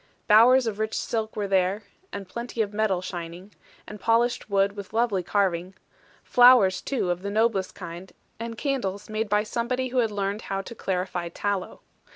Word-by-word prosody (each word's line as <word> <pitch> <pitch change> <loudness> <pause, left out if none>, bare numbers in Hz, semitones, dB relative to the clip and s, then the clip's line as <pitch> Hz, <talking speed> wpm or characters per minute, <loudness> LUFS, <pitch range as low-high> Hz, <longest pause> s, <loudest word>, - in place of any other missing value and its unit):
Bowers 240 +4 +6
of 215 -2 -3
rich 220 0 -1
silk 220 -1 -3
were 205 -1 -2
there, 190 +2 +1 0.3
and 200 -2 -6
plenty 235 0 -3
of 205 -1 -7
metal 205 -4 0
shining, 175 +2 -7 0.3
and 210 - -9
polished 230 +2 +1
wood 200 0 +2
with 200 0 -9
lovely 225 -4 +1
carving; 185 -1 -1 0.5
flowers 245 -6 +6
too 240 -10 -1
of 175 0 -3
the 200 - -4
noblest 210 -2 0
kind, 175 +1 -9 0.3
and 230 0 -5
candles 215 -8 -3
made 215 0 -2
by 210 +1 +2
somebody 245 +4 -2
who 255 +1 0
had 230 -2 +2
learned 205 +1 -2
how 195 -3 -3
to 235 - -9
clarify 180 -4 -3
tallow. 200 +1 -3
205 Hz, 175 wpm, -25 LUFS, 190-230 Hz, 0.5 s, Bowers